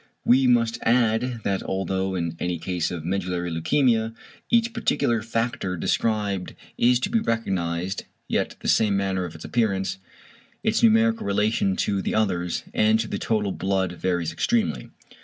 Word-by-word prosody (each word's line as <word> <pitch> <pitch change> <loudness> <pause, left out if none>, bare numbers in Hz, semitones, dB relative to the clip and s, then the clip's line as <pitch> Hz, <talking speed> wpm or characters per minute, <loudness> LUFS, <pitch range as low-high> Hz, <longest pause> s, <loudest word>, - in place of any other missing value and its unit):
We 130 +2 +5
must 115 -2 +2
add 120 0 +1
that 100 -1 0
although 95 0 -2
in 85 -2 -2
any 90 -1 -1
case 90 0 -2
of 85 -3 -6
medullary 90 -1 -2
leukæmia 115 - +1 0.3
each 235 0 +2
particular 120 - +1
factor 115 -4 -2
described 100 0 -1 0.2
is 120 0 +3
to 195 - -1
be 230 - +3
recognised, 95 - -2 0.2
yet - - -1
the 110 - +3
manner 95 -2 0
of 80 - -8
its 80 - -9
appearance, 100 -5 0 0.6
its 220 0 +1
numerical 225 - +4
relation 100 -1 +1
to 100 -1 0
the - - -2
others 90 -5 0
and 110 +1 +3
to 115 - -1
the - - -3
total 105 -3 0
blood 95 -1 -1
varies 90 -2 -1
extremely. 225 - 0
100 Hz, 150 wpm, -24 LUFS, 90-115 Hz, 0.6 s, We